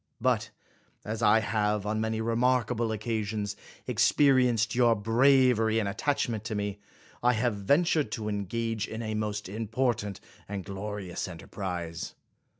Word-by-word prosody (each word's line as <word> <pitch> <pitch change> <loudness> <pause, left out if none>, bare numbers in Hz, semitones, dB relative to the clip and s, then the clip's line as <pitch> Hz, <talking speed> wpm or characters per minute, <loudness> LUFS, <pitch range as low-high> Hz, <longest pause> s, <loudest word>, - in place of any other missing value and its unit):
But - - +1 0.6
as 110 +1 -4
I 110 0 +5
have, 105 -2 0
on 110 +1 -1
many 110 0 -1
remarkable 120 0 +1
occasions, 105 -1 -2 0.3
experienced 125 -6 +3
your 120 -2 +4
bravery 115 0 +4
and 110 -3 +1
attachment 110 +1 -1
to 110 -1 -3
me, 105 -1 -3 0.4
I 125 +1 +4
have 120 +1 +1
ventured 150 - +2
to 110 -4 -3
engage 110 +2 -2
in 110 +1 -5
a 110 -1 -3
most 105 -1 -2
important 110 0 -1 0.3
and 100 -2 -4
glorious 100 -2 -5
en 90 -3 -8
terprise. 85 -3 -5
110 Hz, 135 wpm, -29 LUFS, 105-120 Hz, 0.6 s, I